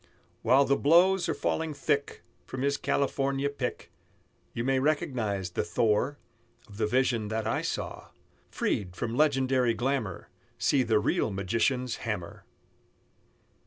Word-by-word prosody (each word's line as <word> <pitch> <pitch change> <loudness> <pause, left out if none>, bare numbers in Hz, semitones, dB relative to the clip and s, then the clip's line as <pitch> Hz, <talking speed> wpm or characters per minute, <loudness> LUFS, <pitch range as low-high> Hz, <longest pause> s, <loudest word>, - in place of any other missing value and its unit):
While 130 +4 +5
the 140 - +3
blows 175 +6 +4
are - - 0
falling 160 -2 -2
thick 140 0 -1 0.2
From 130 0 -4
his 140 0 +2
California 140 0 0
pick, 130 -3 -5 0.6
You 115 - -3
may 135 +1 +2
recognize 120 - -1
the - - -1
Thor 110 +10 +1 0.5
Of 100 - -13
the 110 -1 +1
vision 120 -2 +1
that 110 +1 -2
I - - 0
saw, - - -4 0.4
Freed 90 -3 -2
from 115 - -3
legendary 130 -4 +2
glamour, 120 -8 -2 0.3
See 140 - +2
the 115 -3 +2
real 105 - +1
magician's 115 +6 0
hammer. 95 -7 -5
125 Hz, 130 wpm, -28 LUFS, 110-140 Hz, 0.6 s, While